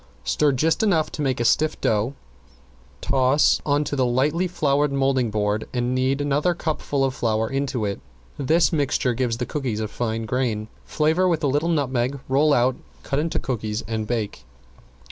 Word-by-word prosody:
Stir 140 Hz, -, +2 dB
just 160 Hz, +5 st, +1 dB
enough 165 Hz, -8 st, +2 dB
to -, -, -5 dB
make 130 Hz, -4 st, 0 dB
a 120 Hz, -, 0 dB
stiff 155 Hz, +6 st, +2 dB
dough, 110 Hz, +5 st, 0 dB, 0.9 s
toss 135 Hz, +2 st, +3 dB
on 145 Hz, +1 st, +2 dB
to 145 Hz, -, -3 dB
the 130 Hz, -, +1 dB
lightly 145 Hz, +9 st, +1 dB
floured 145 Hz, -4 st, +1 dB
molding 135 Hz, -3 st, +1 dB
board 105 Hz, 0 st, -1 dB
and 125 Hz, 0 st, 0 dB
knead 130 Hz, +2 st, +1 dB
another 145 Hz, +5 st, +1 dB
cupful 145 Hz, -4 st, -1 dB
of 130 Hz, -, -1 dB
flour 110 Hz, -2 st, 0 dB
into 135 Hz, -3 st, -2 dB
it. 100 Hz, -1 st, -3 dB, 0.3 s
This 160 Hz, +6 st, +2 dB
mixing 140 Hz, -4 st, +1 dB
gives 120 Hz, -2 st, -1 dB
the 125 Hz, -, -2 dB
cookies 130 Hz, -7 st, -3 dB
a 110 Hz, -, -2 dB
fine 115 Hz, 0 st, -3 dB
grain. 110 Hz, -3 st, -1 dB, 0.2 s
Flavor 160 Hz, +4 st, +1 dB
with 165 Hz, -4 st, 0 dB
a -, -, +3 dB
little 145 Hz, +5 st, +1 dB
nutmeg, 135 Hz, -4 st, 0 dB
roll 145 Hz, +3 st, +3 dB
out, 125 Hz, -1 st, +3 dB, 0.3 s
cut 140 Hz, -, -1 dB
into 160 Hz, +2 st, -1 dB
cookies, 110 Hz, -4 st, -3 dB
and 110 Hz, -2 st, -3 dB
bake. 105 Hz, -, -3 dB
135 Hz, 175 wpm, -23 LUFS, 120-150 Hz, 0.9 s, toss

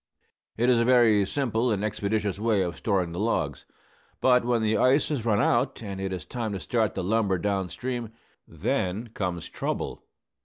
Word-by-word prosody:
It 120 Hz, +2 st, +2 dB
is 125 Hz, -2 st, +4 dB
a -, -, +3 dB
very 115 Hz, -4 st, +5 dB
simple 125 Hz, -1 st, 0 dB
and 105 Hz, -3 st, 0 dB
expeditious 105 Hz, -1 st, -1 dB
way 110 Hz, -3 st, +2 dB
of 85 Hz, -3 st, -3 dB
storing 95 Hz, -5 st, 0 dB
the 85 Hz, -, -5 dB
logs. 80 Hz, -, -1 dB, 0.5 s
But 125 Hz, -2 st, +4 dB
when 120 Hz, -2 st, +1 dB
the 110 Hz, 0 st, +2 dB
ice 130 Hz, +7 st, +3 dB
has 130 Hz, -7 st, -2 dB
run 105 Hz, -2 st, +3 dB
out, -, -, +1 dB
and 100 Hz, -2 st, -5 dB
it 95 Hz, 0 st, -2 dB
is 90 Hz, -4 st, -5 dB
time 115 Hz, -4 st, -4 dB
to 95 Hz, -, -3 dB
start 110 Hz, -1 st, 0 dB
the -, -, -2 dB
lumber 100 Hz, -1 st, +1 dB
down 95 Hz, 0 st, -1 dB
stream, 120 Hz, -1 st, -4 dB, 0.4 s
then 100 Hz, +6 st, -2 dB
comes 90 Hz, -6 st, -3 dB
trouble. -, -, -4 dB
110 Hz, 185 wpm, -26 LUFS, 95-120 Hz, 0.5 s, very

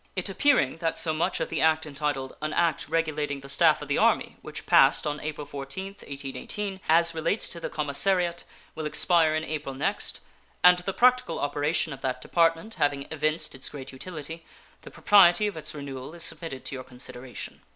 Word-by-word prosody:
It 185 Hz, 0 st, -2 dB
appearing 220 Hz, -, +3 dB
that 165 Hz, -1 st, -1 dB
so 165 Hz, -1 st, +1 dB
much 155 Hz, +2 st, 0 dB
of -, -, -2 dB
the 165 Hz, -, -1 dB
act 160 Hz, 0 st, +3 dB
entitled 140 Hz, -2 st, -3 dB
"An 155 Hz, 0 st, -2 dB
act 165 Hz, -5 st, +1 dB
regulating 150 Hz, -3 st, -1 dB
the 140 Hz, -, -10 dB
staff 140 Hz, -, +4 dB
of -, -, -8 dB
the -, -, +1 dB
Army", -, -, +2 dB
which -, -, -8 dB
passed -, -, +5 dB
on 150 Hz, 0 st, -2 dB
April 150 Hz, -1 st, -5 dB
14, 140 Hz, +6 st, -6 dB
1818, 190 Hz, +4 st, -6 dB
as 165 Hz, +1 st, +4 dB
relates 165 Hz, +6 st, 0 dB
to 170 Hz, -, -5 dB
the -, -, -4 dB
commissariat 170 Hz, +4 st, 0 dB, 0.3 s
will 155 Hz, -1 st, -4 dB
expire 160 Hz, 0 st, +3 dB
in 155 Hz, -, -1 dB
April 150 Hz, -4 st, -4 dB
next, 135 Hz, -, -2 dB, 0.4 s
and 180 Hz, 0 st, +8 dB
the 180 Hz, +2 st, -3 dB
practical 250 Hz, -7 st, +3 dB
operation 145 Hz, +2 st, 0 dB
of 135 Hz, -, -10 dB
that 130 Hz, -1 st, -2 dB
department 165 Hz, +8 st, +1 dB
having 145 Hz, -1 st, +1 dB
evinced 155 Hz, +1 st, -1 dB
its 130 Hz, -, -4 dB
great 135 Hz, -2 st, -8 dB
utility, 160 Hz, +3 st, -8 dB, 0.4 s
the -, -, -11 dB
propriety 195 Hz, -1 st, +5 dB
of 205 Hz, -, -2 dB
its 155 Hz, -1 st, -5 dB
renewal 140 Hz, +1 st, -7 dB
is 170 Hz, -, -3 dB
submitted 160 Hz, -6 st, -4 dB
to -, -, -5 dB
your 130 Hz, -1 st, -5 dB
consideration. 125 Hz, 0 st, -9 dB
155 Hz, 185 wpm, -27 LUFS, 140-170 Hz, 0.4 s, and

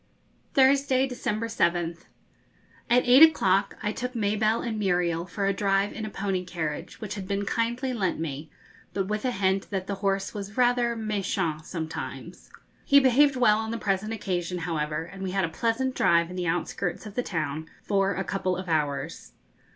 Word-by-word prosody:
Thursday, 270 Hz, -1 st, +4 dB
December 240 Hz, -4 st, -2 dB
7th. 170 Hz, -4 st, 0 dB, 0.8 s
At 245 Hz, +1 st, +4 dB
eight 255 Hz, +4 st, +7 dB
o'clock 195 Hz, -12 st, +5 dB
I 210 Hz, -, 0 dB
took 250 Hz, +2 st, -5 dB
Mabelle 215 Hz, +1 st, +1 dB
and 225 Hz, -3 st, -3 dB
Muriel 175 Hz, -3 st, 0 dB
for 195 Hz, +3 st, -2 dB
a 195 Hz, -, +2 dB
drive 195 Hz, 0 st, +1 dB
in 220 Hz, -, -5 dB
a -, -, -4 dB
pony 195 Hz, -3 st, -2 dB
carriage 160 Hz, -4 st, -5 dB
which 210 Hz, -2 st, -5 dB
had 195 Hz, -2 st, -6 dB
been 200 Hz, 0 st, -1 dB
kindly 240 Hz, +4 st, -1 dB
lent 195 Hz, -9 st, -1 dB
me, 155 Hz, -1 st, -5 dB, 0.5 s
but 195 Hz, -1 st, 0 dB
with 210 Hz, +3 st, -2 dB
a 255 Hz, -, +1 dB
hint 190 Hz, -2 st, 0 dB
that 190 Hz, -2 st, -3 dB
the 200 Hz, -, -3 dB
horse 195 Hz, -1 st, 0 dB
was 205 Hz, 0 st, -7 dB
rather 245 Hz, -1 st, +3 dB
méchant 195 Hz, -7 st, -2 dB
sometimes. 160 Hz, -3 st, -6 dB, 0.3 s
He 280 Hz, -, +6 dB
behaved 270 Hz, +1 st, +4 dB
well 220 Hz, -4 st, +4 dB
on 220 Hz, 0 st, -3 dB
the 230 Hz, -, -2 dB
present 200 Hz, 0 st, -1 dB
occasion, 180 Hz, -5 st, -2 dB
however, 155 Hz, -3 st, -2 dB
and 190 Hz, +3 st, -11 dB
we 190 Hz, -, -2 dB
had 190 Hz, 0 st, +1 dB
a -, -, -4 dB
pleasant 230 Hz, +9 st, -1 dB
drive 170 Hz, -4 st, +3 dB
in -, -, -7 dB
the 180 Hz, -1 st, -2 dB
outskirts 175 Hz, +3 st, -2 dB
of 210 Hz, -, -8 dB
the 245 Hz, -, 0 dB
town 160 Hz, -6 st, -3 dB
for 195 Hz, -1 st, +1 dB
a 190 Hz, -, -1 dB
couple 185 Hz, -2 st, -1 dB
of 185 Hz, 0 st, -6 dB
hours. 150 Hz, -4 st, -2 dB
195 Hz, 180 wpm, -27 LUFS, 175-230 Hz, 0.8 s, eight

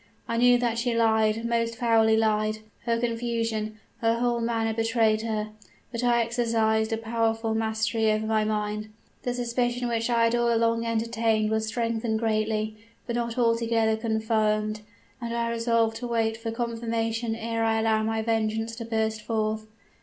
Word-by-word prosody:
I 230 Hz, -, -1 dB
knew 245 Hz, +1 st, +6 dB
that 235 Hz, -1 st, 0 dB
she 240 Hz, 0 st, 0 dB
lied, 220 Hz, 0 st, +2 dB
most 230 Hz, 0 st, 0 dB
foully 225 Hz, -1 st, +3 dB
lied: 215 Hz, -1 st, +1 dB, 0.3 s
her 230 Hz, -1 st, +1 dB
confusion, 230 Hz, -2 st, -2 dB, 0.2 s
her 230 Hz, -1 st, +2 dB
whole 240 Hz, 0 st, 0 dB
manner 225 Hz, -1 st, 0 dB
betrayed 225 Hz, -1 st, +2 dB
her. 215 Hz, -1 st, -2 dB, 0.4 s
But 235 Hz, 0 st, -3 dB
I 240 Hz, -1 st, +3 dB
exercised 225 Hz, -1 st, +1 dB
a 225 Hz, -, 0 dB
powerful 225 Hz, 0 st, 0 dB
mastery 220 Hz, 0 st, +1 dB
over 215 Hz, 0 st, 0 dB
my 220 Hz, 0 st, +2 dB
mind; 210 Hz, 0 st, -2 dB, 0.3 s
the 245 Hz, -, -2 dB
suspicion 245 Hz, 0 st, -1 dB
which 230 Hz, 0 st, -1 dB
I 235 Hz, -1 st, +3 dB
had 230 Hz, 0 st, +3 dB
all 240 Hz, 0 st, +2 dB
along 230 Hz, 0 st, +1 dB
entertained 225 Hz, -1 st, +1 dB
was 220 Hz, 0 st, 0 dB
strengthened 230 Hz, -1 st, -1 dB
greatly, 215 Hz, -1 st, -1 dB, 0.3 s
but 235 Hz, -, -3 dB
not 235 Hz, 0 st, -2 dB
altogether 230 Hz, -2 st, +2 dB
confirmed; 220 Hz, -1 st, 0 dB, 0.4 s
and 235 Hz, 0 st, -3 dB
I 235 Hz, 0 st, 0 dB
resolved 230 Hz, -1 st, +1 dB
to 245 Hz, -, -5 dB
wait 225 Hz, -1 st, 0 dB
for 225 Hz, 0 st, -5 dB
confirmation 230 Hz, 0 st, -2 dB
ere 230 Hz, 0 st, -2 dB
I 225 Hz, 0 st, +2 dB
allowed 220 Hz, -1 st, +2 dB
my 220 Hz, 0 st, -1 dB
vengeance 225 Hz, 0 st, -1 dB
to 230 Hz, -, -5 dB
burst 220 Hz, -1 st, -1 dB
forth. 215 Hz, -1 st, -2 dB
225 Hz, 160 wpm, -26 LUFS, 220-230 Hz, 0.4 s, knew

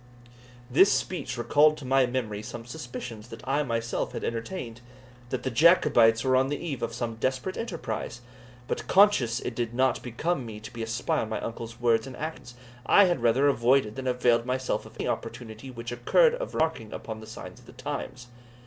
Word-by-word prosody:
This 155 Hz, +11 st, +5 dB
speech 155 Hz, -8 st, -2 dB
recalled 150 Hz, +6 st, +4 dB
to 140 Hz, -, -9 dB
my 135 Hz, 0 st, +3 dB
memory 115 Hz, -5 st, -3 dB
some 115 Hz, +2 st, -8 dB
suspicions 120 Hz, -4 st, -7 dB
that 115 Hz, +1 st, -11 dB
I 140 Hz, +2 st, +2 dB
myself 115 Hz, -4 st, -2 dB
had -, -, -5 dB
entertained, 115 Hz, 0 st, -4 dB, 0.5 s
that 130 Hz, -, -3 dB
the 130 Hz, -, -1 dB
Jacobites 115 Hz, -6 st, +5 dB
were 130 Hz, -1 st, +3 dB
on 130 Hz, +1 st, +3 dB
the 145 Hz, -, -1 dB
eve 145 Hz, -6 st, -5 dB
of 115 Hz, -, -2 dB
some 115 Hz, -1 st, -4 dB
desperate 130 Hz, +9 st, -1 dB
enterprise. 125 Hz, -, -4 dB, 0.5 s
But, -, -, -3 dB
conscious 185 Hz, -, +4 dB
it 125 Hz, -, -4 dB
did 120 Hz, 0 st, -3 dB
not 130 Hz, +1 st, +2 dB
become 130 Hz, +5 st, -2 dB
me 110 Hz, -3 st, -8 dB
to 110 Hz, -, -10 dB
be 115 Hz, -, -6 dB
a 115 Hz, -, -3 dB
spy 115 Hz, +2 st, 0 dB
on 110 Hz, -, -3 dB
my 110 Hz, -, -2 dB
uncle's 115 Hz, +1 st, -6 dB
words 115 Hz, 0 st, +2 dB
and 130 Hz, -, -9 dB
actions, 150 Hz, -6 st, -6 dB, 0.3 s
I 200 Hz, +10 st, +6 dB
had 175 Hz, -8 st, 0 dB
rather 120 Hz, +4 st, +4 dB
avoided 125 Hz, -3 st, +3 dB
than 130 Hz, -1 st, -4 dB
availed 125 Hz, -2 st, +3 dB
myself 130 Hz, +1 st, -2 dB
of -, -, -16 dB
any -, -, -2 dB
opportunity 115 Hz, +2 st, -5 dB
which 120 Hz, -2 st, -7 dB
occurred 295 Hz, -, +4 dB
of -, -, -5 dB
remarking 155 Hz, -9 st, -1 dB
upon 110 Hz, -1 st, -6 dB
the 110 Hz, -, -11 dB
signs 110 Hz, -, -9 dB
of -, -, -20 dB
the -, -, -13 dB
times. 125 Hz, -1 st, -6 dB
125 Hz, 195 wpm, -27 LUFS, 115-135 Hz, 0.5 s, I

